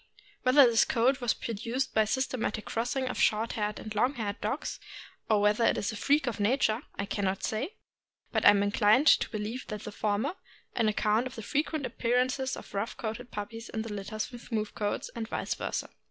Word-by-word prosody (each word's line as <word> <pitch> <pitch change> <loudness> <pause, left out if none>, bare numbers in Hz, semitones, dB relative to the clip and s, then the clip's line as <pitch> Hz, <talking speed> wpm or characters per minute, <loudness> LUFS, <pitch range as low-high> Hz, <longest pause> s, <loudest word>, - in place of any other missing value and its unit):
Whether 260 +2 +7
this 230 -2 +5
coat 255 +3 +2
was 240 -2 +1
produced 235 +4 -3
by 220 -1 +4
systematic 240 -2 -1
crossing 245 +3 -1
of 250 - -3
short 220 +2 +2
haired 210 -1 -2
and 215 - -6
long 245 +7 +2
haired 210 -4 -4
dogs, - - -3 0.5
or 215 -2 +4
whether 210 +2 +3
it - - +3
is 205 - -1
a - - -6
freak 285 +7 +2
of 235 -5 -3
nature, 220 +1 +2
I 200 - -2
can 200 0 -3
not 190 0 -1
say; 265 - -2 0.6
but - - 0
I - - +10
am 200 -1 +5
inclined 210 +6 +4
to - - +5
believe 220 +4 -4
the 210 - -4
former, 210 - -2 0.4
on 230 -3 +2
account 215 +3 +2
of 255 - -10
the 225 - -7
frequent 300 +2 -1
appearance 250 +2 +1
of 265 0 -4
rough 200 +3 -3
coated 235 +2 -5
puppies 225 +3 -6
in 220 - -3
litters 215 0 -4
fiom 245 - -9
smooth 215 -3 -3
coats, 205 -1 -2
and 225 -1 -4
vice - - -2
versa. - - -3
225 Hz, 200 wpm, -29 LUFS, 210-255 Hz, 0.6 s, I